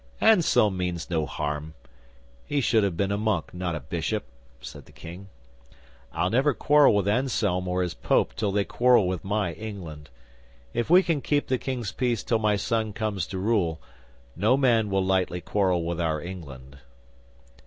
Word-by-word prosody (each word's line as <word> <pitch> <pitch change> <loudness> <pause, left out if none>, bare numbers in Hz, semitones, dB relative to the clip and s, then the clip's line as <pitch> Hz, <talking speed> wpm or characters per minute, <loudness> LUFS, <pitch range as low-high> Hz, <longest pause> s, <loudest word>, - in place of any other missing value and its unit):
'"Anselm 170 - +4
means 90 -2 -3
no 80 -3 0
harm. 75 +1 -4 0.7
He 145 - 0
should 115 -5 +2
have 95 -4 -1
been 100 +1 0
a 100 - -1
monk, 105 -6 -1
not 90 -1 -3
a - - -3
bishop," 85 - -3 0.4
said - - -10
the - - -18
King. 90 +4 -11 0.8
"I'll 90 - -1
never 135 +3 +2
quarrel 145 0 +5
with 100 -1 +1
Anselm 105 -6 0
or 90 0 0
his 90 - -3
Pope - - +1
till 105 -2 -1
they 100 0 +1
quarrel 120 -3 +3
with 90 -2 -3
my 100 -3 -1
England. 85 -9 -8 0.6
If 120 +3 -2
we 180 +3 +7
can 165 -5 0
keep 145 +1 0
the 130 -1 +1
King's 120 -7 -4
peace 120 -5 -1
till 115 - +1
my 105 -1 +2
son 110 +1 -1
comes 100 -4 -2
to 95 - -5
rule, 95 -5 0 0.6
no 110 +9 +3
man 115 -6 +2
will 95 -1 +1
lightly 95 -2 0
quarrel 90 -3 0
with 85 0 -2
our 80 -2 0
England." 70 -6 -9
100 Hz, 175 wpm, -26 LUFS, 85-115 Hz, 0.8 s, we